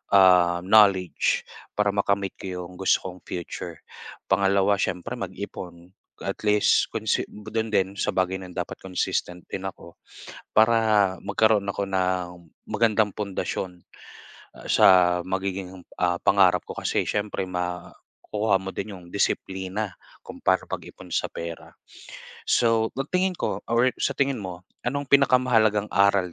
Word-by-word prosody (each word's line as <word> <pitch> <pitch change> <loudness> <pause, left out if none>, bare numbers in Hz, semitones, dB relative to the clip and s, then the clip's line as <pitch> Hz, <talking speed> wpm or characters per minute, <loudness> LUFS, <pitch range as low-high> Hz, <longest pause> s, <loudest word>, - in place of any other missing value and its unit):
ah, 90 -2 +6
knowledge 95 -3 +4 0.3
para 105 -1 +2
makamit 100 -1 0
ko - - -8 0.2
'yong 90 +1 -11
gusto 95 - +2
kong 90 0 -9
future. 85 -2 -6 0.5
Pangalawa 100 +1 +3
siyempre 90 - -2
mag-ipon 85 0 -7 0.3
at - - -3
least 105 0 +4
consi - - 0
dun 110 +2 -4
din 95 +1 +1
sa - - 0
bagay 95 0 +1
na 95 - -9
'yon - - -13
dapat 90 - -4
consistent 90 -1 -3
din 95 - -4
ako 85 -2 -11 0.6
para 110 -3 +4
magkaroon 110 -2 +2
ako 100 0 -2
ng 95 -1 0 0.4
magandang 110 -2 +2
pundasyon, 95 -3 -4 0.8
ah, - - -12
sa - - +5 0.4
magiging, 95 -1 -4 0.2
ah, 90 -1 +2
pangarap 95 -2 +4
ko. - - -6
Kasi - - 0
siyempre 105 -2 -2
makukuha 90 +3 -3
mo 95 0 -7
din 105 - -4
'yong 90 -1 -14
disiplina 95 0 -2 0.3
kung - - -10
paano - - +2
mag-ipon - - -8
sa - - 0
pera. 85 0 -7 0.8
So 115 -2 +3
ang 135 - -2
tingin 185 0 +1
ko - - -2
aware 120 +2 +3
sa - - +1
tingin 135 -4 0
mo, 90 0 -8 0.2
anong 140 +3 -2
pinakamahalagang 125 -6 +4
aral 100 -3 +3
100 Hz, 135 wpm, -25 LUFS, 90-110 Hz, 0.8 s, ah